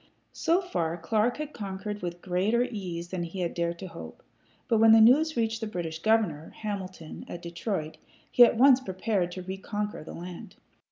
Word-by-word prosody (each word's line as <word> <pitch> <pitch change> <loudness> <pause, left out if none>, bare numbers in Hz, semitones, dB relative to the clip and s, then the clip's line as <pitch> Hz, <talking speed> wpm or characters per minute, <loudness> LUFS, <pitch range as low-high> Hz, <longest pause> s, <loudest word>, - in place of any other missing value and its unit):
So 345 +3 +2
far, 170 - -2
Clark 215 +7 0
had 300 0 -5
conquered 205 0 -5
with 175 0 -5
greater 195 +7 +1
ease 180 -8 -5
than 185 -1 -3
he 170 +2 -4
had 170 - -1
dared 170 0 -1
to 190 - -7
hope. 80 - -10 0.4
But 225 - +3
when 225 0 +7
the 225 - +8
news 280 +7 +5
reached 225 -1 0
the 220 - -2
British 165 -5 -4
governor, 215 -6 +1
Hamilton, 190 -6 -6
at 175 - -7
Detroit, 170 -2 -4 0.3
he 245 - +8
at 235 - +5
once 260 +1 +7
prepared 190 -4 -1
to 185 - -6
reconquer 205 +1 -4
the - - -9
land. 180 +4 -9
195 Hz, 180 wpm, -28 LUFS, 175-225 Hz, 0.4 s, the